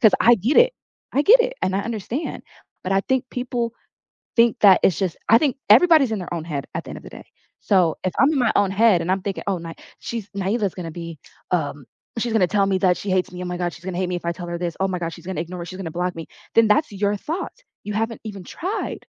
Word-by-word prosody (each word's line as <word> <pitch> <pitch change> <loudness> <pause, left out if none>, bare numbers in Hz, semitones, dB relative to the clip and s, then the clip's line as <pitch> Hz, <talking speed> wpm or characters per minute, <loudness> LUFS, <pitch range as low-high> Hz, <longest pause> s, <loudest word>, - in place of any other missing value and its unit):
'cause 220 -5 +6
I 240 - +7
get 230 +10 0
it. - - +6 0.4
I 280 - +2
get 460 +10 +7
it, - - 0
and 190 - 0
I 200 - +1
understand. 230 - -4 0.4
But 185 - -1
I 195 - +3
think 260 -2 +1
people 245 -2 -3 0.6
think 235 +1 +4
that 195 -3 +7
it's 185 - +3
just 185 -4 -1
I 225 - +8
think 275 -3 0
everybody's 280 0 +6
in 215 - -1
their 180 - -7
own 165 -2 -3
head 145 -4 -4
at 165 - -2
the - - -8
end - - -7
of - - -19
the - - -10
day. - - -11 0.4
So 180 -6 +2
if 185 - -1
I'm 275 +3 +5
in 290 - 0
my 245 - +3
own 200 -1 +3
head 200 -3 +4
and 180 - -1
I'm 190 - 0
thinking, 200 -2 -4
"Oh, 195 -2 +1
Ny 165 0 -7 0.3
she's 225 -4 -6
Nyela's 200 0 -1
gonna 170 -3 -6
be, 165 -1 -7 0.3
um, 145 -6 -1 0.3
she's 235 0 -1
gonna 210 -5 +4
tell 200 +1 +2
me 190 - +1
that 180 -1 +3
she 200 - -6
hates 185 -1 +1
me. 180 - -7
Oh - - -5
my 180 0 -4
god, 175 -1 -2
she's 175 - -14
gonna 185 -2 -4
hate 185 -1 -1
me 180 - -1
if 170 - -10
I 170 - +1
tell 175 +1 -7
her 170 0 -3
this. 170 -2 -3
Oh 195 - +2
my 180 -1 -2
god, 165 - -2
she's 170 - -13
gonna 185 -3 -3
ignore 170 +1 -6
she's 185 +1 -8
gonna 190 -4 -5
block 180 +2 -2
me," 165 -1 -7 0.3
then 225 -1 +6
that's 210 +7 +2
your 205 +1 0
thought. 325 - -4 0.3
You 210 - -5
haven't 225 +1 -2
even 200 -4 -7
tried. 370 - -4
195 Hz, 270 wpm, -22 LUFS, 175-230 Hz, 0.6 s, I